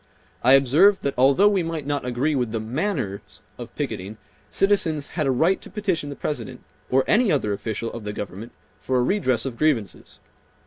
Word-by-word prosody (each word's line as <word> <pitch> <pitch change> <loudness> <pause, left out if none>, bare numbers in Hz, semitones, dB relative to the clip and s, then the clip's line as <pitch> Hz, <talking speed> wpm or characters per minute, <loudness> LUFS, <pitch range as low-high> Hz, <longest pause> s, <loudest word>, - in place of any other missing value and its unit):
I 130 +2 +6
observed 145 +10 +5
that 140 - -1
although 140 +10 +4
we 200 -3 +2
might 165 -3 -4
not 145 -2 -2
agree 125 +5 0
with 125 -4 0
the 115 - -2
"manners" 120 - -4 0.2
of - - -9
picketing, 100 +4 -5 0.3
citizens 185 -7 +1
had 155 -4 -2
a - - +3
right 165 +9 +2
to - - -10
petition 185 -8 -2
the 140 - -6
President 125 -8 -5 0.3
or 130 +1 +3
any 220 -2 +3
other 105 -8 0
official 110 +2 -4
of 115 - -7
the 105 - -4
government 105 +2 -7 0.3
for 130 - -1
a 125 - +2
redress 130 - 0
of 125 -3 -5
grievances. 135 -11 -1
135 Hz, 185 wpm, -23 LUFS, 115-165 Hz, 0.3 s, I